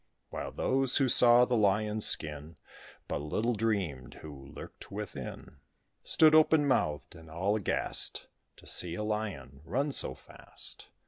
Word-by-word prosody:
While - - -6
those 135 0 0
who 135 - +1
saw 120 0 +6
the 125 - -2
Lion's 105 0 +1
skin, 75 +1 -3 0.5
But - - -4
little 105 +11 -2
dreamed 100 - -3
who 70 -3 -11
lurked 70 - -13
within, - - -9 0.5
Stood 155 -1 +4
open 155 -1 +4
mouthed, 75 - -2
and 80 -2 -15
all 95 +6 -2
aghast, 105 - +3 0.3
To - - -18
see 85 -1 +1
a 105 - -5
Lion 105 -10 -6
run 135 - -3
so 65 - +2
fast. - - -7
105 Hz, 140 wpm, -29 LUFS, 80-120 Hz, 0.5 s, saw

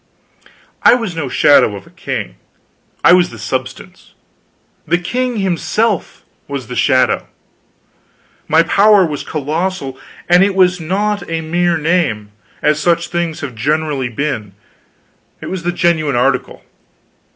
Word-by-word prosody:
I - - +6
was 225 -8 -4
no 150 -5 -3
shadow 125 -6 +4
of 100 - -10
a - - -19
king; - - -5 0.7
I 175 - +7
was 180 -1 +4
the 115 - -11
substance; 100 -1 -6 0.7
the 175 - +2
king 245 +7 -2
himself 195 +2 -1 0.2
was 140 -3 -5
the 125 +2 -7
shadow. 130 +1 +2 1.2
My 160 +2 +4
power 200 +3 +4
was 150 -3 -4
colossal; 155 -2 -3 0.3
and 175 +2 +5
it 195 -1 +1
was 180 -1 +3
not 205 +5 -2
a 165 0 -2
mere 170 +1 0
name, 155 -11 0 0.3
as 150 0 +2
such 170 +2 +1
things 170 -2 -3
have 140 -4 -5
generally 145 +2 -1
been, 110 -6 -4 0.8
it - - -7
was 190 -2 -3
the 175 +1 -1
genuine 170 -5 +1
article. 125 +1 0
165 Hz, 135 wpm, -16 LUFS, 140-180 Hz, 1.2 s, I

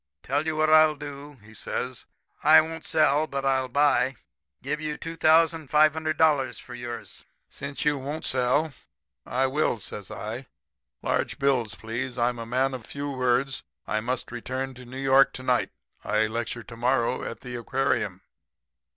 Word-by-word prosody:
Tell 145 +4 -1
you 160 - 0
what 155 0 +2
I'll 155 -1 +7
do,' 145 0 -8
he 110 +1 -15
says. 125 +2 -5 0.4
'I - - +8
won't 160 0 -6
sell, 155 -1 +3
but 140 -1 -3
I'll 130 -1 +2
buy. 135 -1 +3 0.5
Give 150 +3 -2
you 150 -1 -3
$2,500 155 -2 +3
for 125 - -11
yours.' 120 -1 -7 0.3
"'Since 140 +1 -6
you 150 -2 +2
won't 145 +4 -5
sell, 130 +4 +1 0.5
I 130 +2 +1
will,' 135 -3 +1
says 100 0 -7
I. 115 +4 -6 0.6
'Large - - 0
bills, 130 -6 +1
please. 120 +3 -4
I'm 120 0 +1
a 115 - -6
man 130 +3 +1
of 125 -3 -7
few 140 0 -4
words. 130 +1 +1 0.2
I 110 - 0
must 125 +3 -2
return 130 +2 -4
to 125 0 -12
New 130 +2 -9
York 135 0 +5
to 130 - -7
night. 125 -1 +2 0.3
I 105 +1 +2
lecture 115 +1 -3
to 115 - -11
morrow 125 +1 +1
at - - -6
the 125 -1 -7
aquarium.' 130 +3 -1
135 Hz, 160 wpm, -26 LUFS, 125-150 Hz, 0.6 s, I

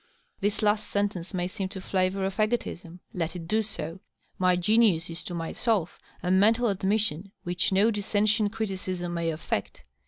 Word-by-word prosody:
This 205 +2 0
last 210 0 +2
sentence 200 -4 -1
may 180 -2 -1
seem 190 +1 -4
to 190 - -7
flavor 190 +1 0
of 190 0 -3
^otism. 215 -6 -1 0.2
Let 170 -1 -2
it 165 -2 -6
do 220 +4 +2
so. 165 -5 -5 0.4
My 185 -1 +4
genius 180 -2 +3
is 165 - -4
to 175 - -4
myself 175 +2 -1 0.2
a 180 - +1
mental 220 +5 +4
admission 195 -2 0
which 175 0 +1
no 200 +4 +4
dissentient 210 0 +1
criti 215 -4 -2
cism 175 -2 -3
may 170 -1 0
affect. 155 -10 -3
190 Hz, 165 wpm, -27 LUFS, 175-210 Hz, 0.4 s, My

